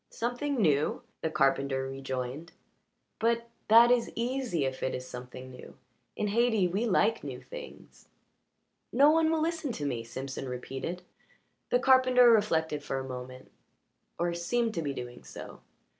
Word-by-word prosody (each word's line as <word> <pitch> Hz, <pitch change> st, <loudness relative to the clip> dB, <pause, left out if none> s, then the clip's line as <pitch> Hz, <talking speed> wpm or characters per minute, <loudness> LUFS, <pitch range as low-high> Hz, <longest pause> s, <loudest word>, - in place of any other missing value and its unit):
"Something 245 Hz, +4 st, -2 dB
new?" 150 Hz, -7 st, +2 dB, 0.2 s
the 160 Hz, -, 0 dB
carpenter 135 Hz, -2 st, +1 dB
rejoined. 135 Hz, +3 st, -5 dB, 0.7 s
"But 235 Hz, +1 st, +1 dB, 0.2 s
that 230 Hz, +2 st, +8 dB
is 245 Hz, -2 st, +2 dB
easy 240 Hz, -, -1 dB
if 130 Hz, 0 st, -4 dB
it 130 Hz, -, -1 dB
is 130 Hz, 0 st, -6 dB
something 125 Hz, +1 st, -9 dB
new. 125 Hz, -, -12 dB, 0.4 s
In 210 Hz, -, -1 dB
Hayti 220 Hz, -3 st, +3 dB
we 200 Hz, +7 st, -1 dB
like 220 Hz, +2 st, +2 dB
new -, -, -6 dB
things." -, -, -11 dB, 0.8 s
"No 285 Hz, +4 st, +6 dB
one 320 Hz, 0 st, +3 dB
will 320 Hz, -1 st, +1 dB
listen 325 Hz, -4 st, -1 dB
to 145 Hz, -, -4 dB
me," 120 Hz, -5 st, -2 dB
Simpson 130 Hz, +3 st, -6 dB
repeated. 135 Hz, +8 st, -5 dB, 0.7 s
The -, -, +4 dB
carpenter 255 Hz, -, +6 dB
reflected 160 Hz, -9 st, +2 dB
for 135 Hz, -, -3 dB
a 130 Hz, 0 st, -4 dB
moment, 130 Hz, 0 st, -8 dB, 0.7 s
or 175 Hz, 0 st, 0 dB
seemed 225 Hz, +7 st, 0 dB
to 165 Hz, -, -2 dB
be 140 Hz, -3 st, -3 dB
doing 120 Hz, -, -7 dB
so. 60 Hz, -1 st, -10 dB
170 Hz, 150 wpm, -29 LUFS, -, 0.8 s, that